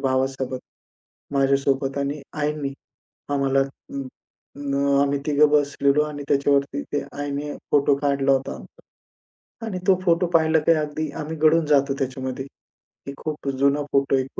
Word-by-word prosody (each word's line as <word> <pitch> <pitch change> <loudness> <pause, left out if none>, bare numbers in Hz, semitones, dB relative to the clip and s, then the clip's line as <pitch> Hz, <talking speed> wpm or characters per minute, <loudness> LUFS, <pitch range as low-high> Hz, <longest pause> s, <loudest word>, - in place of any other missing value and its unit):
भावासोबत, 130 -1 -1 0.8
माझ्यासोबत 135 0 +1
आणि 140 +1 -2 0.2
आईनी 150 -2 -1 0.6
आम्हाला 135 -1 +2
अं, 135 0 -5 0.5
न 140 -1 -3 0.3
आम्ही 140 0 +1
तिघं 150 0 +4
बसलेलो 145 0 +3
आणि 150 -1 -6
त्याच्यावरती 140 0 +2
ते 145 - 0 0.2
आईने 145 +1 -3 0.2
फोटो 140 0 +4
काढला 140 -1 +1
होता 135 0 0
आमचा. - - -14 0.9
आणि 190 -5 -4
तो 190 - +6
फोटो 170 +1 +3
पाहिला, 160 -1 +4
की 160 +2 +2
अगदी 155 -1 0
आम्ही 155 +2 -5
गडून 155 +1 +4
जातो 140 -2 +3
त्याच्यामध्ये. 130 0 -3 0.6
एक 140 - -4
खूप 150 -2 -5
जुना 140 +1 +3
फोटो 135 0 +2
आहे, 130 -1 +1
140 Hz, 140 wpm, -23 LUFS, 135-150 Hz, 0.9 s, तो